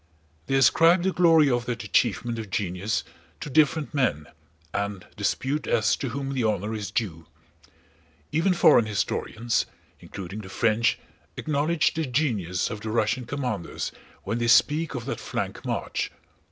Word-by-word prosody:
They 135 - +1
ascribe 165 +7 +5
the 190 - +2
glory 165 -4 +5
of 120 0 0
that 120 -2 -3
achievement 115 +3 +1
of 110 -3 -6
genius 95 +2 -1 0.4
to 145 - -6
different 155 +1 +2
men 115 - +1 0.5
and 100 -2 -3
dispute 145 +3 -1
as 110 -1 +2
to 135 - -3
whom 135 +2 -4
the 130 -3 0
honor 105 0 0
is 105 -2 -4
due. 95 -8 -3 1.0
Even 180 +3 +2
foreign 115 -9 +5
historians, 110 +2 -1 0.3
including 95 +2 -8
the 95 - -10
French, 110 +4 +2 0.4
acknowledge 155 +2 +1
the 160 -2 -2
genius 110 - 0
of 105 -2 -6
the 110 - -4
Russian 115 +2 0
commanders 125 -11 -3 0.3
when 110 +5 -2
they 120 - 0
speak 150 +6 +4
of 120 -2 -4
that - - -4
flank - - -4
march. - - -2
120 Hz, 150 wpm, -26 LUFS, 105-145 Hz, 1.0 s, ascribe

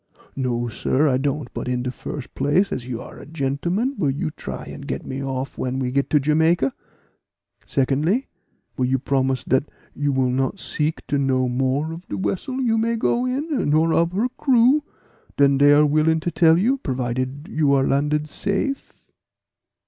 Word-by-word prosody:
"No, 120 -3 -1
sir, 130 +6 +1
I 130 -3 +3
don't; 140 -1 -2
but - - -5
in 125 -1 -1
de 125 - -2
first 130 +1 -7
place 145 +9 +1
as 125 -1 -4
you 120 -3 -4
are - - -10
a - - -10
gentleman, 165 - -1
will 145 - +2
you 140 +3 -2
try - - -7
and - - -9
get - - -4
me 135 +1 -4
off 135 0 -4
when 130 0 -2
we 130 -1 -1
get 140 +1 0
to 150 - +4
Jamaica? 155 0 +2 0.9
Secondly, 150 - +1 0.5
will 130 - 0
you 130 +1 +2
promise 130 -1 0
dat 130 +3 +1 0.2
you 145 0 -1
will 130 -2 +1
not 135 +8 0
seek 155 -3 -2
to 145 - 0
know 130 -2 +1
more 135 +5 0
of 170 +3 -10
de - - -4
vessel 255 +7 -2
you 225 -3 +2
may 230 +1 +1
go 240 +2 +1
in, 275 - -1
nor 160 +2 +3
of 170 +1 +2
her 220 +6 +1
crew, 260 +2 +4 0.6
than 140 -1 +4
dey 145 +1 +6
are 150 +1 +6
willing 155 +2 +2
to 175 - -2
tell 165 0 +5
you, 250 +9 +2
provided 130 - -3
you 155 -9 +1
are 135 -1 +3
landed 150 +2 +1
safe?" 200 - -3
145 Hz, 185 wpm, -22 LUFS, 130-175 Hz, 0.9 s, dey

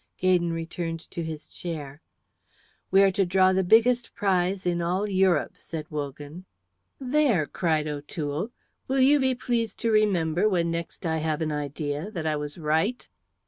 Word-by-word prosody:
Gaydon 180 -2 +2
returned 165 0 -4
to 170 - -4
his 160 -2 -6
chair. 155 -4 -7 0.9
"We 195 +1 +6
are 195 - +5
to 195 +1 +1
draw 185 +1 +3
the 190 0 +2
biggest 235 +5 +3
prize 190 -2 0
in 175 -1 0
all 185 +4 0
Europe," 190 -5 +2
said 160 -2 -6
Wogan. 145 +3 -6 0.5
"There!" 260 - +2
cried 155 -1 0
O'Toole. 150 +4 -4 0.4
"Will 270 +1 +1
you 285 +3 +5
be 260 -1 +2
pleased 235 -3 -2
to 230 - +1
remember 195 -3 +2
when 170 -4 +1
next 170 +2 -5
I 160 -1 0
have 155 0 -1
an 155 - -2
idea 150 +3 -3
that 170 -7 -5
I 155 -1 +1
was 150 +1 -5
right?" 160 +9 0
175 Hz, 160 wpm, -26 LUFS, 155-200 Hz, 0.9 s, We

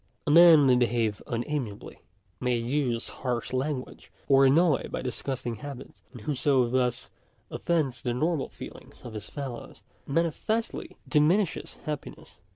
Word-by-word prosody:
A 150 - +1
man 165 -2 +8
may 130 -2 +5
behave 115 -4 +1
unamiably, 120 -3 -4 0.4
may 125 -1 +1
use 120 0 -1
harsh 125 -2 -2
language, 130 0 -3 0.2
or 135 -1 +6
annoy 155 +1 +3
by - - -4
disgusting 125 -1 -3
habits; 135 +2 -9
and 120 -4 -11
whoso 135 -1 +2
thus 125 0 0 0.4
offends 140 -8 -1
the 120 -1 -2
normal 155 +2 0
feelings - - -12
of 120 - -8
his 105 -1 -6
fellows, 135 -5 -7 0.2
manifestly 170 +9 -1
di 150 - +3
minishes 175 +5 +1
happiness. 150 -2 -6
130 Hz, 135 wpm, -27 LUFS, 120-150 Hz, 0.4 s, man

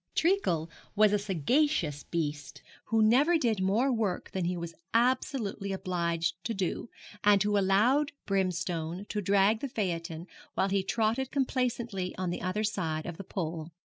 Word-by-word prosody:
Treacle 320 - +2 0.3
was 210 0 +5
a 210 - +3
sagacious 195 - +1
beast, 145 -4 -4 0.2
who 225 -1 +2
never 280 +10 +5
did 230 -9 0
more 220 +8 +2
work 215 -6 -1
than 185 -2 -2
he 180 +1 -1
was 170 -1 -5 0.2
absolutely 235 -4 +1
obliged 170 -3 -1
to 230 - -1
do, 195 +4 -2 0.3
and 205 -1 +5
who 205 0 +1
allowed 215 +9 +3
Brimstone 180 -2 -1
to 210 - -2
drag 200 +3 +3
the 280 - -4
phaeton 170 -6 -3 0.3
while 195 - +1
he 195 0 +2
trotted 225 +6 0
complacently 240 -8 -1
on 185 -2 -1
the - - -4
other 185 +4 -1
side 165 -7 -1
of 175 -2 -6
the 195 - -6
pole. 165 -3 -4
195 Hz, 155 wpm, -30 LUFS, 175-225 Hz, 0.3 s, was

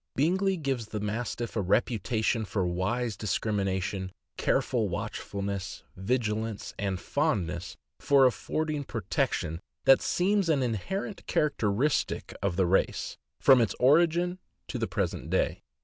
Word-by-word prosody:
Bingley 190 +6 +2
gives 135 -7 -2
the 105 - -4
Mastiff 115 +3 -3
a 110 - +1
reputation 110 +3 +1
for 100 -2 -1
wise 100 +6 -1
discrimination, 95 -2 -1 0.2
careful - - +1
watchfulness, 100 -1 -4
vigilance, 110 0 -1
and 95 -2 -1
fondness 95 - -1 0.2
for 140 -2 +5
affording 150 +4 0
pro 115 -4 -5
tection, 80 -3 -1 0.3
that 135 - +7
seems 195 0 +1
an 145 -4 +3
inherent 185 - -3
characteristic 135 -1 +1
of 100 -2 0
the 95 0 +3
race 95 +2 +1 0.2
from 130 -2 +7
its 115 - +1
origin 170 +6 +4 0.3
to - - -4
the - - 0
present - - -2
day. - - +1
115 Hz, 125 wpm, -29 LUFS, 100-145 Hz, 0.3 s, that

